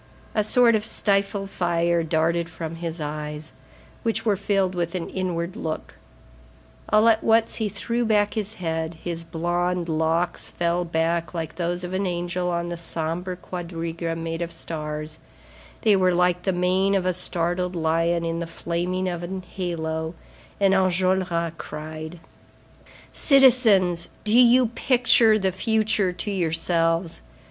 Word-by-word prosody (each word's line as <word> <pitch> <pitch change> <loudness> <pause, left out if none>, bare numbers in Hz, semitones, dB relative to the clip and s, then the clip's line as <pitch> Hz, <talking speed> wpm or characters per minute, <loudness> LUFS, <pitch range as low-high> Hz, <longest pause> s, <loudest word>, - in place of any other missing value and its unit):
A 215 - +2
sort 235 +2 +5
of 215 -1 +1
stifled 195 -2 0
fire 170 -1 +1
darted 165 +1 0
from 165 0 -6
his 165 0 -5
eyes, 150 0 -5 0.5
which 225 -1 -1
were 210 -3 +3
filled 195 -1 0
with 175 -1 -2
an 175 -2 -3
inward 180 -1 -3
look. 160 -9 -5 0.9
All 215 +2 +5
at 225 -1 +4
once 225 0 +3
he 220 -2 -1
threw 235 +4 -2
back 210 -2 +2
his 215 -1 -4
head, 160 -1 -3
his 170 -1 -4
blond 175 +1 -1
locks 160 +2 0
fell 175 +1 -1
back 165 +1 -1
like 160 -2 -4
those 175 0 -2
of 180 +1 -5
an 190 +1 0
angel 175 0 -2
on 170 0 -2
the 175 - -4
sombre 170 +2 -2
quadriga 170 -2 -5
made 165 0 -4
of 170 0 -3
stars, 155 -1 -5 0.6
they 210 -2 +5
were 185 -2 +3
like 180 0 +2
the 190 - 0
mane 185 +2 +2
of 190 -2 0
a 185 - +2
startled 180 0 -1
lion 165 +1 +1
in 165 0 -2
the 170 - -4
flaming 175 +3 -2
of 175 -2 -3
an 185 +2 -5
halo, 160 -3 -4 0.4
and 195 -1 +4
Enjolras 185 -2 +1
cried: 155 +2 -7 0.9
"Citizens, 230 - +5
do 215 - 0
you 250 +1 +7
picture 235 -1 +4
the 190 -2 0
future 215 0 +1
to 180 +4 -4
yourselves? 165 - 0
175 Hz, 145 wpm, -24 LUFS, 165-195 Hz, 0.9 s, you